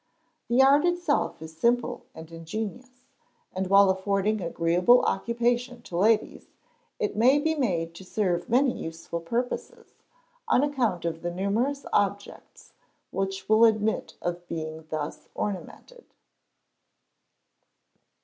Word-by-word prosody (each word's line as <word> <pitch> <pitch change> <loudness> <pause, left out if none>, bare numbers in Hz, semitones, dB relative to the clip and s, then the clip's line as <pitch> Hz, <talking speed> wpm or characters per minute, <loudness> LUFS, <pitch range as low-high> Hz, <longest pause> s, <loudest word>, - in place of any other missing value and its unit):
The 245 +3 +4
art 280 +3 +5
itself 350 - 0
is 160 0 -10
simple 235 +8 0
and 160 0 -11
ingenious, 220 +10 -7 0.5
and 185 0 -2
while 195 0 +6
affording 200 +2 0
agreeable 175 +7 +3
occupation 240 +1 -1
to 175 - -8
ladies, 215 +4 +1 0.5
it 435 -4 -2
may 250 +6 +5
be 320 +2 +1
made 175 - -1
to 170 - -11
serve 180 -3 -1
many 255 +3 +3
useful 165 +1 -6
purposes, 245 - -4 0.5
on 260 - +3
account 240 -12 0
of 165 -1 -3
the 175 - -2
numerous 215 +10 -1
objects 200 0 -2 0.4
which 195 0 -3
will 220 +1 +5
admit 220 -1 +2
of 175 0 -4
being 160 -1 -6
thus 155 -1 -5
ornamented. 340 - -6
210 Hz, 120 wpm, -26 LUFS, 175-245 Hz, 0.5 s, while